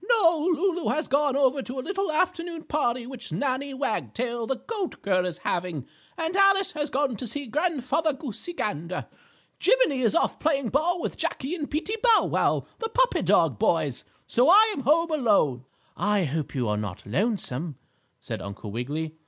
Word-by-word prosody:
"No, 340 -8 +4
Lulu 355 +1 0
has 310 - -1
gone 285 0 +2
over 275 0 +3
to 260 +1 -6
a 255 - -5
little 390 -3 -1
afternoon 335 0 -1
party 250 -5 -1
which 250 -1 -8
Nannie 275 0 -2
Wagtail, 240 -2 -2
the 265 - 0
goat 380 - -5
girl, 185 -2 +2
is 175 -2 -4
having, 175 -7 -3 0.3
and 325 +2 -2
Alice 390 0 +4
has 300 -1 -3
gone 270 -2 0
to 245 - -5
see 285 +5 -4
Grandfather 310 +2 0
Goosey 285 - -6
Gander. 180 - -3 0.5
Jiminie 430 - +3
is 225 -4 +2
off - - +1
playing 280 -6 +1
ball 335 +7 +1
with - - -3
Jackie 275 +5 -2
and 305 -5 -4
Peetie 350 +9 -2
Bow 465 -3 +5
Wow, - - +1
the 450 - -2
puppy - - +2
dog - - +3
boys, - - +1 0.2
so 250 +5 +3
I 430 +4 +7
am 275 - -4
home 320 +5 +3
alone." 200 - +2 0.3
"I 205 -1 +1
hope 150 -1 -3
you 125 -3 0
are 105 0 0
not 100 -4 -5
lonesome," 155 - -1 0.4
said - - -6
Uncle 100 +1 -7
Wiggily. 145 +8 -3
275 Hz, 175 wpm, -26 LUFS, 205-335 Hz, 0.5 s, I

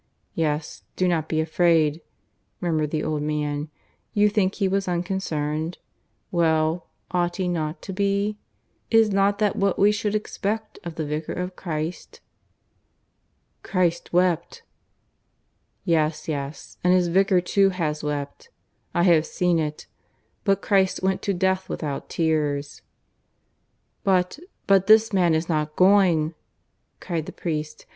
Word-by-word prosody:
"Yes, 150 -2 -2
do 185 - +1
not 160 -3 0
be 155 - 0
afraid," 160 -1 +2 0.6
murmured 155 -4 0
the 155 0 -2
old 155 -1 -1
man. 150 0 -2 0.5
"You 210 0 +5
think 200 -2 +1
he 195 - +1
was 195 0 0
unconcerned? 170 -3 -2 0.5
Well, 160 -1 +1 0.2
ought 175 -1 0
he 185 -2 -1
not 160 -2 -3
to 190 - -6
be? 200 +2 0 0.5
Is 225 -2 +4
not 200 +1 +2
that 210 -1 +1
what 195 -1 +1
we 205 +1 +5
should 210 0 -1
expect 215 +1 -3
of 170 -2 -6
the 160 - -3
Vicar 150 +1 -3
of 180 0 -4
Christ?" 160 -1 -5 1.4
"Christ 175 -3 0
wept." 175 -1 +1 1.2
"Yes, 160 -3 +1
yes, 140 -2 -5
and 180 +1 +5
his 180 -1 +3
Vicar 190 +2 +3
too 195 +2 +3
has 155 -5 -2
wept. 145 - -4 0.5
I 175 - +3
have 165 -3 +4
seen 175 -2 +1
it. 150 -1 -3 0.6
But 195 -2 +1
Christ 190 -2 +2
went 190 0 +1
to 200 - -1
death 190 +1 0
without 145 -3 -4
tears." 150 -3 -1 1.2
"But... 185 +3 +1 0.3
but 195 -1 +4
this 220 0 +6
man 175 -4 +3
is 160 +1 -1
not 150 -2 -1
going," 180 -5 +4 0.7
cried 165 -4 -3
the - - -5
priest. 155 -3 -4
175 Hz, 135 wpm, -24 LUFS, 155-195 Hz, 1.4 s, this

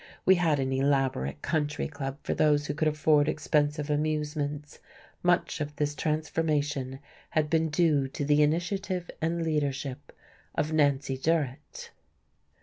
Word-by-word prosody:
We 190 - +7
had 165 -5 +2
an 135 0 -1
elaborate 130 - 0
country 150 -2 -1
club 135 -2 -5
for - - -1
those 150 -1 +3
who 145 - -2
could 155 +1 0
afford 150 -1 +3
expensive 150 -1 0
amusements. 150 -1 -2 0.4
Much 175 -2 +1
of 150 0 -4
this 145 0 -1
transformation 150 -3 -1 0.3
had 155 -1 0
been 160 -1 +2
due 150 -3 +2
to 140 +2 -4
the 150 +1 +4
initiative 175 +4 0
and 165 +1 0
leadership 145 -3 -2 0.4
of 155 +1 -1
Nancy 140 -3 +1
Durrett.... 150 -2 -2
150 Hz, 135 wpm, -28 LUFS, 145-155 Hz, 0.4 s, We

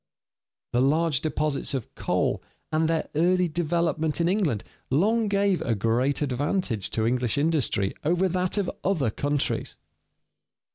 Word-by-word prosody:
The 120 - +3
large 150 +1 +2
deposits 150 -2 -1
of 130 - -5
coal - - 0 0.3
and 160 +1 +2
their 165 -1 0
early 180 +3 +3
development 160 -1 0
in 170 - +2
England 175 - +1 0.3
long 215 - +2
gave 200 -2 +1
a 115 - 0
great 120 +7 +1
advantage 135 - -1
to 110 - 0
English 120 0 0
industry 145 -10 +1
over 175 +5 +2
that 185 +2 -1
of 200 -3 0
other 160 - +1
countries. 145 +4 -1
155 Hz, 135 wpm, -26 LUFS, 130-175 Hz, 0.3 s, The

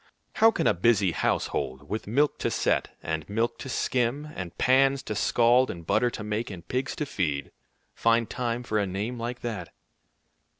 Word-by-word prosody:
How 225 - +7
can 225 - -1
a - - +5
busy 100 0 +3
household, 70 -3 -1
with 110 +4 -4
milk 140 +7 +2
to - - 0
set, - - 0
and 80 0 -3
milk 115 +3 -1
to 130 - -7
skim, 130 +4 0
and 90 -2 -6
pans 135 +1 +3
to - - -4
scald, 120 +4 +3
and 85 -1 -7
butter 120 - +2
to 110 - -6
make, 105 +2 -2
and 90 -4 -9
pigs 130 +2 -2
to 150 - -2
feed, 75 - -2 0.4
find 115 0 +2
time 120 -1 -2
for 110 -3 0
a 100 - 0
name 105 +6 -3
like 120 +1 -4
that? 115 -3 -5
115 Hz, 180 wpm, -27 LUFS, 95-125 Hz, 0.4 s, How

